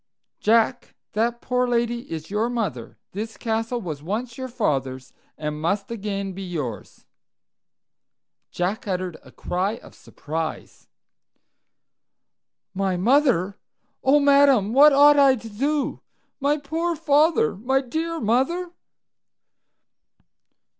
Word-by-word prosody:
"Jack, 230 +3 +1 0.2
that 235 +2 0
poor 250 0 0
lady 235 0 -1
is 160 +2 -6
your 215 +3 0
mother. 195 - -4
This 215 +2 -6
castle 225 +1 -2
was 160 -9 -6
once 225 +8 -4
your 260 +1 -5
father's, 135 - -2 0.2
and 150 0 -4
must 200 +6 -1
again 200 -3 -4
be 195 - -8
yours. 150 - -6 1.4
Jack 185 +5 -3
uttered 185 -3 -3
a - - -17
cry 185 +4 -2
of - - -15
surprise. 160 +1 -6 1.9
"My 190 -1 -1
mother! 220 - +2 0.4
oh, 280 +3 +5
madam, 280 -7 +4
what 290 +3 +8
ought 290 +1 +6
I 275 -2 +6
to 225 -2 -9
do? 275 +6 -1 0.4
My 285 +2 +1
poor 325 +4 -2
father! 300 - +2
My 255 +7 +1
dear 320 +6 -3
mother!" 270 +11 0
230 Hz, 115 wpm, -23 LUFS, 185-275 Hz, 1.9 s, what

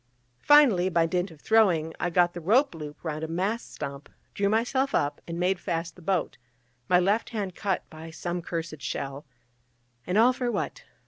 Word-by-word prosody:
Finally, 250 -12 +6
by 170 -2 +2
dint 180 +3 -1
of 160 -3 -15
throwing, 175 -7 +3
I 175 - 0
got 175 0 +3
the 175 - -7
rope 235 - +3
loop 150 -2 -9
round 155 -2 -4
a - - -2
mast 190 +8 -2
stump, 140 -1 -7 0.2
drew 200 0 +1
myself 255 +5 +1
up, 145 0 0
and 170 0 -5
made 180 +1 +1
fast 165 -2 -3
the 180 - -15
boat, 180 0 -1 0.5
my 180 - +5
left 200 +5 +1
hand 205 -6 -3
cut 195 +1 -2
by 160 +1 -9
some 175 +2 -4
cursed 165 -3 -5
shell: 140 +1 -5 0.8
and 180 +3 +1
all 240 +3 +6
for 250 -1 -2
what? - - -4
175 Hz, 185 wpm, -27 LUFS, 160-205 Hz, 0.8 s, Finally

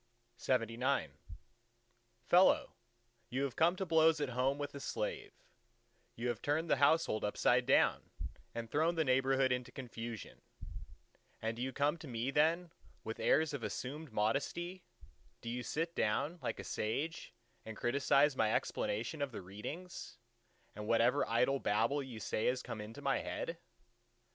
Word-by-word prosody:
LXXX 125 +2 0 1.1
Fellow, 180 +2 +5 0.6
you 130 +3 -1
have 135 -4 -2
come 170 +3 +4
to 190 - -3
blows 160 -1 +4
at 145 -3 -1
home 130 +3 +1
with 145 0 -4
a 140 - -6
slave: - - -3 0.8
you 120 +2 -3
have 120 -3 -3
turned 155 +3 0
the - - +5
household 140 -5 +3
upside 105 - +2
down, - - +3 0.5
and 115 -1 -4
thrown 160 +3 +2
the 160 - +2
neighbourhood 130 0 +3
into 125 0 -1
confusion; 115 -4 -7 1.0
and 115 +1 -2
do - - -5
you 130 +1 -1
come 145 +4 +1
to 155 - -9
me 120 +1 -2
then 165 +4 +2 0.3
with 110 +1 -5
airs 155 -1 +3
of 140 - -3
assumed 130 +7 -5
modesty—do 115 - -4
you 120 +1 -2
sit 165 +7 -2
down 145 +11 0
like - - -3
a - - -5
sage 145 +10 -3 0.3
and 110 -1 -8
criticise 140 +3 +3
my 110 -3 +2
explanation 120 +8 -2
of 140 -2 -1
the 110 - -7
readings, 140 - -7 0.6
and 105 +1 -7
whatever 120 +5 +3
idle 125 +4 +2
babble 115 +8 +1
you 125 -5 -7
say 110 +1 -1
has 125 +1 0
come 115 -3 -5
into 105 +2 -9
my - - +2
head? - - -4
130 Hz, 150 wpm, -35 LUFS, 115-150 Hz, 1.1 s, Fellow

